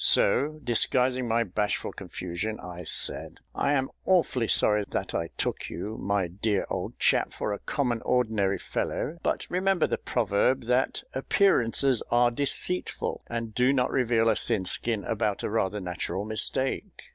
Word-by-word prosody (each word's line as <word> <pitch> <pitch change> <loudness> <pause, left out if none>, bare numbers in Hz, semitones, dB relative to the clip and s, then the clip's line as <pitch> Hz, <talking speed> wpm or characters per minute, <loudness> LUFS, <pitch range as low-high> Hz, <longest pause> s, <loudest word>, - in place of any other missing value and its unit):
So, 150 +9 +4
disguising 125 +1 +2
my 115 +1 +2
bashful 105 0 -2
confusion, 90 +5 -5
I 90 -1 -8
said, - - -1 0.2
"I 140 - +1
am 135 -2 0
awfully 160 -10 +2
sorry 105 -1 +3
that - - -3
I 85 0 -1
took - - -2
you, 105 +5 -5
my 100 -2 0
dear 100 +3 -1
old - - -3
chap, - - +2
for 105 - -2
a 100 - -5
common 125 -5 -1
ordinary 110 -6 +1
fellow; 170 +3 -3
but - - -1
remember 190 0 +2
the - - -2
proverb, 120 +3 +1
that 125 +3 0
'appearances 135 - +3
are 120 0 +4
deceitful,' 145 +7 -1
and 115 -2 -4
do 125 +3 +3
not 125 -2 +1
reveal 120 -3 +2
a 110 - +4
thin 105 -5 -1
skin 110 +2 -1
about 105 -1 -1
a - - -2
rather 105 -2 0
natural 90 +2 -3
mistake." 110 +5 -1
115 Hz, 155 wpm, -27 LUFS, 100-130 Hz, 0.2 s, So